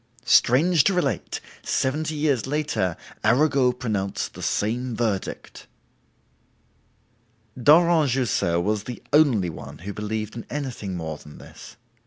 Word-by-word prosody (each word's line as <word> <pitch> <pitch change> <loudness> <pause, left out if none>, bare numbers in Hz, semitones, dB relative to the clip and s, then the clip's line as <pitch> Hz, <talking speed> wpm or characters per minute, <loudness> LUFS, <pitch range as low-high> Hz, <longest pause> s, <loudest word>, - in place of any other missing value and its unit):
Strange 145 +7 +4
to 195 - +2
relate, 140 - -1 0.2
seventy 155 +4 -1
years 145 -6 0
later, 145 - -1 0.3
Arago 135 0 +3
pronounced 110 -6 -3
the - - -10
same 120 +3 -1
verdict!" 110 -5 -3 1.9
Daurent 155 +3 +5
Jussieu 120 -9 +1
was 105 +3 -1
the 125 - -7
only 125 - +4
one 75 -1 -10
who 100 - -4
believed 105 +1 -4
in 115 - -6
anything 125 -10 -4
more 80 -2 -5
than 75 - -13
this. - - -13
125 Hz, 120 wpm, -24 LUFS, 105-145 Hz, 1.9 s, Daurent